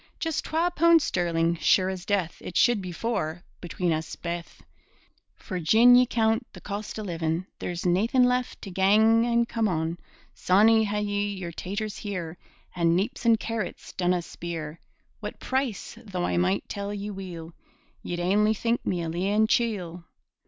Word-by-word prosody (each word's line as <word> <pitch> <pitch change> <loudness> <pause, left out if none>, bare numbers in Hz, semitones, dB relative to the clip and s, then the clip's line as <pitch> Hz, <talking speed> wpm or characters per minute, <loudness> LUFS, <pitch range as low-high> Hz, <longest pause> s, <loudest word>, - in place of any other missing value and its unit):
Jus' 325 -2 -1
twa 335 +3 0
poond 335 +1 +6
sterling', 170 - 0
sure 185 +3 +3
as 190 -2 -4
death 195 -5 0
It 180 - -4
should 240 -4 +4
be 180 -1 -6
four, 175 -4 -3 0.2
between 175 -1 -1
us 160 0 -4
baith 170 0 -6 0.7
For 185 -3 -6
gin 225 +9 +6
ye 250 0 +5
coont 225 -1 +1
the - - -10
cost 205 +2 -6
o' 215 - -4
livin', 165 -1 -2
There's 175 0 -4
naethin' 215 +8 +3
left 250 0 0
to 195 - -7
gang 220 +5 +4
an' 235 0 +2
come 230 -2 0
on. 165 -1 -2 0.3
Sawney, 220 +4 +4
had 210 0 -1
ye 205 0 -1
yer 180 -3 -6
taters 205 +5 -4
here 180 -5 -5 0.4
And 170 -1 +2
neeps 230 +6 -2
and 230 -2 +5
carrots 225 -4 -5
dinna 180 -1 0
speer 165 -2 -6 0.4
What - - -7
price; 260 -6 -2
though 185 -5 -3
I - - -1
might 185 +3 +1
tell 200 0 -4
ye 205 0 -5
weel, 175 -4 -8 0.5
Ye'd 175 - -4
ainly 210 +5 +2
think 235 +2 0
me 175 -2 -1
a - - -3
leein' 195 +6 +1
chiel. 190 -7 -1
195 Hz, 165 wpm, -26 LUFS, 175-225 Hz, 0.7 s, poond